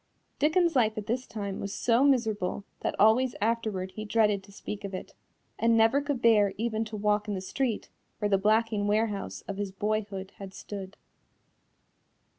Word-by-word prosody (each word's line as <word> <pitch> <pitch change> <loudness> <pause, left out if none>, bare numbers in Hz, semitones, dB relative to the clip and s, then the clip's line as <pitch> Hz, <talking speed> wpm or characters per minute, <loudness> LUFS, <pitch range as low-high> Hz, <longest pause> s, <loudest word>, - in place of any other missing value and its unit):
Dickens's 330 +2 +3
life 220 -3 +3
at 210 - -4
this 250 +4 -2
time 200 -3 -5
was 200 0 -4
so 235 +2 +3
miserable 220 -8 +1 0.2
that - - -3
always 240 +4 +4
afterward 215 -4 -1
he 215 - -6
dreaded 210 -2 +2
to 200 - -16
speak 200 +1 -7
of 200 -1 -4
it, - - -8 0.5
and 230 0 +4
never 225 +5 +4
could 285 -3 -3
bear 210 -4 +5
even 225 0 -1
to 215 0 -6
walk 210 0 +1
in 205 - -2
the - - -2
street 230 +4 -2 0.3
where 210 - 0
the 195 -1 +2
blacking 215 0 +2
warehouse 210 -1 -1
of 200 - -6
his 200 -1 -3
boyhood 200 -1 -2
had 195 -1 -8
stood. 195 -1 -8
215 Hz, 175 wpm, -28 LUFS, 200-230 Hz, 0.5 s, bear